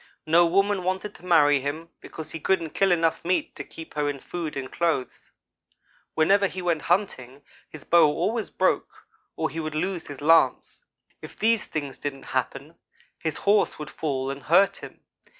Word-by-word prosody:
No 170 Hz, +2 st, +5 dB
woman 195 Hz, +2 st, +2 dB
wanted 190 Hz, +3 st, -3 dB
to -, -, -15 dB
marry 145 Hz, -5 st, +5 dB
him, 155 Hz, +4 st, -5 dB
because 160 Hz, -, -8 dB
he 165 Hz, -, -6 dB
couldn't 165 Hz, -1 st, 0 dB
kill 195 Hz, -1 st, +2 dB
enough 165 Hz, -2 st, +1 dB
meat 180 Hz, +2 st, -1 dB
to -, -, -6 dB
keep 165 Hz, -, -11 dB
her 150 Hz, -1 st, 0 dB
in 140 Hz, -1 st, -4 dB
food 165 Hz, 0 st, -5 dB
and 130 Hz, -1 st, -5 dB
clothes. 165 Hz, -6 st, -2 dB, 0.9 s
Whenever 195 Hz, +5 st, +4 dB
he 185 Hz, -, -7 dB
went 170 Hz, -4 st, 0 dB
hunting, 145 Hz, -8 st, -1 dB, 0.3 s
his 155 Hz, -, -11 dB
bow 170 Hz, -2 st, +5 dB
always 205 Hz, +9 st, -1 dB
broke -, -, -1 dB, 0.3 s
or 160 Hz, -, -2 dB
he 165 Hz, -, -5 dB
would 155 Hz, -1 st, -4 dB
lose 175 Hz, +1 st, -2 dB
his 145 Hz, -2 st, -8 dB
lance. 165 Hz, -, +2 dB, 0.4 s
If -, -, -11 dB
these 225 Hz, 0 st, +2 dB
things 145 Hz, -4 st, -5 dB
didn't 140 Hz, -2 st, -5 dB
happen, 135 Hz, +4 st, -3 dB, 0.4 s
his 160 Hz, -2 st, -3 dB
horse 205 Hz, +1 st, +2 dB
would 150 Hz, 0 st, -7 dB
fall 135 Hz, -3 st, -2 dB
and 140 Hz, +1 st, -7 dB
hurt 195 Hz, +6 st, +3 dB
him. -, -, -11 dB
165 Hz, 175 wpm, -25 LUFS, 145-185 Hz, 0.9 s, No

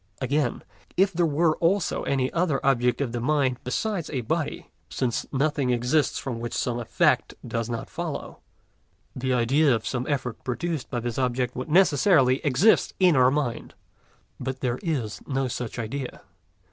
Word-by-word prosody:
Again, 135 Hz, -1 st, 0 dB, 0.3 s
if 195 Hz, +1 st, +3 dB
there 170 Hz, 0 st, +2 dB
were 155 Hz, +1 st, +2 dB
also 175 Hz, +2 st, +1 dB
any 130 Hz, -2 st, 0 dB
other 165 Hz, -5 st, +1 dB
object 125 Hz, -2 st, +2 dB
of 130 Hz, -4 st, -1 dB
the 120 Hz, -, -3 dB
mind 130 Hz, -1 st, +1 dB
besides 180 Hz, -, -2 dB
a 135 Hz, -4 st, -2 dB
body, 110 Hz, -, -3 dB, 0.2 s
since 120 Hz, -3 st, -2 dB
nothing 140 Hz, -1 st, 0 dB
exists 125 Hz, +4 st, +1 dB
from 125 Hz, -4 st, -4 dB
which 120 Hz, 0 st, -4 dB
some 120 Hz, -1 st, -1 dB
effect 120 Hz, -, +1 dB
does 115 Hz, 0 st, -2 dB
not 115 Hz, -1 st, -4 dB
follow, -, -, -5 dB, 0.8 s
the 130 Hz, +1 st, -2 dB
idea 130 Hz, +3 st, +3 dB
of 110 Hz, -, -4 dB
some 125 Hz, -1 st, -2 dB
effort 125 Hz, -5 st, -3 dB
produced 155 Hz, +3 st, -3 dB
by 120 Hz, -, -2 dB
this 120 Hz, +1 st, -3 dB
object 125 Hz, -1 st, 0 dB
would 130 Hz, +3 st, -5 dB
necessarily 150 Hz, -5 st, +4 dB
exist 145 Hz, -, +3 dB
in 180 Hz, -4 st, +5 dB
our 130 Hz, -1 st, +6 dB
mind. 140 Hz, -4 st, -2 dB, 0.6 s
But 130 Hz, 0 st, -4 dB
there 125 Hz, -1 st, -1 dB
is 130 Hz, -, -2 dB
no 135 Hz, -1 st, 0 dB
such 125 Hz, -1 st, -5 dB
idea. 125 Hz, +3 st, -5 dB
130 Hz, 160 wpm, -25 LUFS, 125-150 Hz, 0.8 s, our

